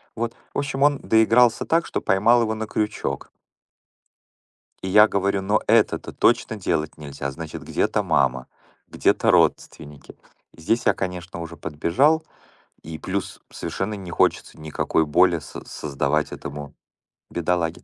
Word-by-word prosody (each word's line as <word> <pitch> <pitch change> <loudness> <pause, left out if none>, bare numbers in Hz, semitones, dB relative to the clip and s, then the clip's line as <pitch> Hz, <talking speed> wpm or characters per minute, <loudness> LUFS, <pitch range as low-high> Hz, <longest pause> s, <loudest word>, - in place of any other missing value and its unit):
Вот, 115 0 -3 0.2
в - - -4
общем, 140 -1 -3
он 145 -1 +3
доигрался 115 +1 +3
так, 165 +1 +1
что - - -3
поймал 110 +6 +3
его 110 -1 0
на 110 0 -5
крючок. 105 0 -3 1.5
И - - -3
я 105 +3 +7
говорю: 100 0 0
"Но 105 +2 +1
это-то 110 -1 +2
точно 110 - +1
делать 85 -7 -2
нельзя!" 70 -2 -6
Значит, 80 +2 -8
где-то - - 0
мама, 65 -1 +1 0.4
где-то - - +1
родственники. 75 -2 -1 0.4
Здесь 115 +9 -1
я, - - +5
конечно, 90 -2 -5
уже 85 0 -7
подбежал, 85 - +1 0.6
и 80 0 -8
плюс 95 +3 -4
совершенно 105 +2 -4
не 95 -3 -8
хочется - - 0
никакой 80 +1 0
боли 75 - +3
со - - -10
создавать 75 +1 -2
этому 70 -1 -8 0.6
бедолаге. 85 -1 -1
95 Hz, 135 wpm, -23 LUFS, 75-110 Hz, 1.5 s, я